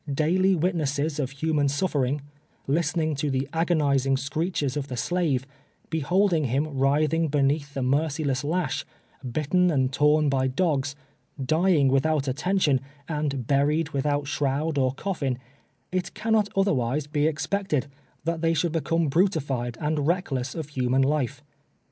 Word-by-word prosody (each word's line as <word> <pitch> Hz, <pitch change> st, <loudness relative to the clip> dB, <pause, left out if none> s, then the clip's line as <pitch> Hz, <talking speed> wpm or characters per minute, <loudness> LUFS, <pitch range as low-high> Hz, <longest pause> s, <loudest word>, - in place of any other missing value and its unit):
Daily 180 Hz, +7 st, +2 dB
witnesses 155 Hz, -3 st, 0 dB
of 135 Hz, -3 st, -1 dB
human 145 Hz, +1 st, 0 dB
suflering 140 Hz, -2 st, 0 dB, 0.3 s
— -, -, -38 dB
listening 155 Hz, +2 st, +1 dB
to 145 Hz, +1 st, -1 dB
the 135 Hz, 0 st, -1 dB
agonizing 145 Hz, -5 st, +2 dB
screeches 145 Hz, 0 st, -2 dB
of 145 Hz, -2 st, -3 dB
the 125 Hz, -3 st, -5 dB
slave 150 Hz, -4 st, 0 dB, 0.2 s
— -, -, -38 dB
beholding 170 Hz, +1 st, +2 dB
him 140 Hz, +4 st, -1 dB
writhing 150 Hz, +4 st, +2 dB
beneath 145 Hz, 0 st, 0 dB
the 135 Hz, -, -1 dB
merciless 140 Hz, 0 st, 0 dB
lash 160 Hz, -1 st, -1 dB, 0.2 s
— 125 Hz, -, -10 dB
bitten 180 Hz, +5 st, +2 dB
and 135 Hz, -4 st, +1 dB
torn 150 Hz, +2 st, +3 dB
by 135 Hz, -1 st, +1 dB
dogs 140 Hz, -1 st, 0 dB, 0.3 s
— 135 Hz, -, -9 dB
dying 165 Hz, -5 st, +4 dB
without 140 Hz, +2 st, +2 dB
attention, 150 Hz, 0 st, +1 dB, 0.3 s
and 150 Hz, -5 st, -2 dB
buried 145 Hz, +4 st, +2 dB
without 145 Hz, 0 st, 0 dB
shroud 145 Hz, +2 st, -1 dB
or 130 Hz, 0 st, +1 dB
cofiin 140 Hz, -8 st, -2 dB, 0.3 s
— -, -, -43 dB
it 185 Hz, 0 st, -2 dB
cannot 220 Hz, -2 st, +1 dB
otherwise 145 Hz, -7 st, +1 dB
be 150 Hz, 0 st, +1 dB
expected, 160 Hz, -1 st, -1 dB
than 140 Hz, -, -19 dB, 0.3 s
that 165 Hz, 0 st, -2 dB
they 165 Hz, 0 st, +2 dB
should 170 Hz, +1 st, +1 dB
become 165 Hz, 0 st, 0 dB
brutified 140 Hz, -, 0 dB
and 150 Hz, -1 st, -1 dB
reckless 140 Hz, -7 st, -1 dB
of 160 Hz, -3 st, -5 dB
human 130 Hz, -1 st, +1 dB
life. 140 Hz, -3 st, -1 dB
150 Hz, 150 wpm, -26 LUFS, 135-165 Hz, 0.3 s, dying